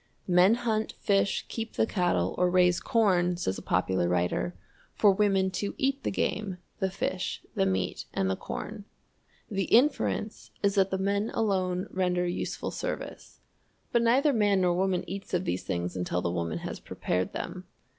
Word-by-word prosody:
"Men 180 +4 +5
hunt, 225 -3 -1
fish, 200 0 +1
keep 225 -1 -5
the - - +2
cattle, 175 - +1
or 180 0 +4
raise 180 -1 +4
corn," 180 -6 +2
says 95 - -2
a - - -9
popular 90 -1 +1
writer, 90 0 0 0.4
"for 205 - +5
women 195 -1 +2
to 200 +2 -3
eat 275 +1 0
the - - -1
game, 195 -1 -1 0.2
the 190 - +1
fish, 185 -1 -3
the 95 - +1
meat, 95 -1 -1
and 95 - 0
the 95 - +1
corn." 210 - -6 0.7
The 195 -2 0
inference 235 - +2
is 200 0 +3
that 195 -1 +3
the 190 - -1
men 200 +3 0
alone 185 -4 0
render 180 -1 +1
useful 175 - -3
service. - - -6 0.5
But 235 - +3
neither 265 +5 +4
man 205 -4 +3
nor 180 -1 +3
woman 185 0 +1
eats 195 +1 -4
of 180 +1 -1
these 90 - -2
things 90 +1 -2
until 90 -1 -1
the 85 - 0
woman 85 -2 -2
has - - -5
prepared 90 +1 -2
them. - - -5
190 Hz, 170 wpm, -28 LUFS, 175-210 Hz, 0.7 s, Men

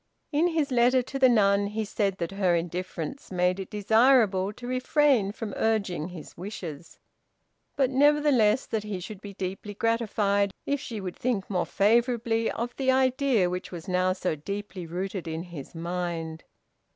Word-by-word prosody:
In 310 +3 +3
his 320 -5 0
letter 250 +1 +4
to 270 +2 -5
the 260 -1 +6
nun 200 -3 +3
he 215 +1 -3
said 200 -2 -1
that 170 0 -3
her 190 -3 +2
indifference 175 - -4
made 180 +1 +1
it 190 - -6
desirable 210 -2 +3
to 245 +3 -11
refrain 255 -3 +2
from 210 -1 -6
urging 200 -8 0
his 175 -4 -10
wishes; 170 -4 -8 0.8
but, 270 -2 +2
nevertheless, 270 -5 +4
that 220 - -2
he 210 -3 -4
should 190 +2 -8
be 200 -2 -9
deeply 195 +3 -5
gratified 205 -3 +1
if 285 0 0
she 225 -4 -6
would 185 -2 -5
think 230 -6 -1
more 180 -2 0
favorably 230 +1 +2
of 240 +1 -4
the 265 -1 0
idea 260 -5 +2
which 180 +1 -4
was 175 +1 -8
now 185 0 +2
so 185 -3 -1
deeply 195 +2 -6
rooted 185 +1 -4
in 160 +1 -3
his 170 -4 -10
mind. 165 -1 -4
205 Hz, 165 wpm, -27 LUFS, 180-240 Hz, 0.8 s, the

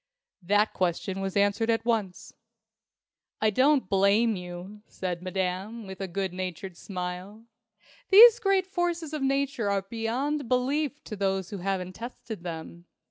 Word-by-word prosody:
That 205 +4 +2
question 185 +2 -1
was 195 0 -2
answered 205 +3 +2
at 225 0 +1
once. 215 -6 -2 1.1
"I 215 0 +2
don't 265 +2 +3
blame 200 +4 +3
you," 180 +3 -8
said 180 -2 -4
Madame, 190 +4 -3
with 190 0 -8
a 195 - -2
good 190 0 -3
natured 185 0 -5
smile. 185 +4 -6 0.6
"These 460 +4 +9
great 390 -4 +2
forces 345 -4 -2
of 305 - -3
Nature 275 -4 0
are 200 -1 0
beyond 240 +6 -2
belief 280 +4 0
to 215 - -7
those 195 -2 -1
who 200 - -5
haven't 185 0 -2
tested 230 -2 -8
them. 170 0 -7
205 Hz, 140 wpm, -27 LUFS, 185-250 Hz, 1.1 s, These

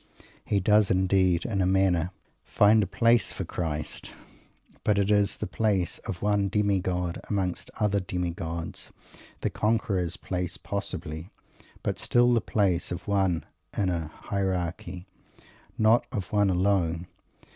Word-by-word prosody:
He 100 - +1
does, 105 +2 +4
indeed, 95 -2 +2
in 100 -4 0
a 90 - +2
manner 95 -3 +2 0.3
find 105 +1 +4
a 100 - 0
place 115 +3 +3
for - - -4
Christ, 80 -3 -3 0.7
but 105 -1 +2
it 100 +1 +2
is 105 -1 +2
the - - -3
place 100 -6 0
of 95 - -5
one 105 -1 +2
demigod 95 -3 0
among 95 -3 +1
many 90 - -6 0.2
other 105 -2 +2
demi 90 -2 -2
gods; 85 0 -5 0.5
the - - -1
conqueror's 100 -6 0
place 90 -2 -3
possibly, 80 +4 -5 0.5
but - - -1
still 120 0 +4
the 115 - +3
place 95 -6 0
of 90 - -5
one 95 -4 +1 0.3
in 95 -2 +2
a 85 -3 -2
hierarchy, 90 0 -3 0.7
not 110 +2 +4
of 100 -7 -4
one 105 -1 +4
alone. 90 -2 +1
95 Hz, 140 wpm, -27 LUFS, 90-105 Hz, 0.7 s, does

